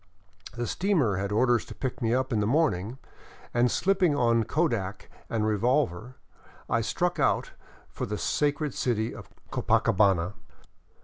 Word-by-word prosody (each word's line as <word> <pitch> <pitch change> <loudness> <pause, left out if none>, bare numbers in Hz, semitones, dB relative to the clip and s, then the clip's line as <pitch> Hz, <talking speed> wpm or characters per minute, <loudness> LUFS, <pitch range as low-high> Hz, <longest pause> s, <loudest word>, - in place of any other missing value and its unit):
The 120 - -1
steamer 155 - +1
had 100 +1 -2
orders 120 +2 +3
to - - -10
pick 130 -3 -4
me 115 -1 +1
up 130 +1 0
in 110 - +1
the 105 - +1
morning, 125 - +1 0.6
and 120 +1 +3
slipping 185 -3 +2
on 115 -4 +2
kodak 115 - -1 0.2
and 110 -2 0
revolver, 120 - 0 0.5
I - - +1
struck - - -1
out - - +1 0.4
for - - -5
the 105 - -3
sacred 145 +2 0
city 115 -2 -1
of - - -11 0.2
Copacabana. 105 -5 +2
120 Hz, 140 wpm, -27 LUFS, 105-140 Hz, 0.6 s, orders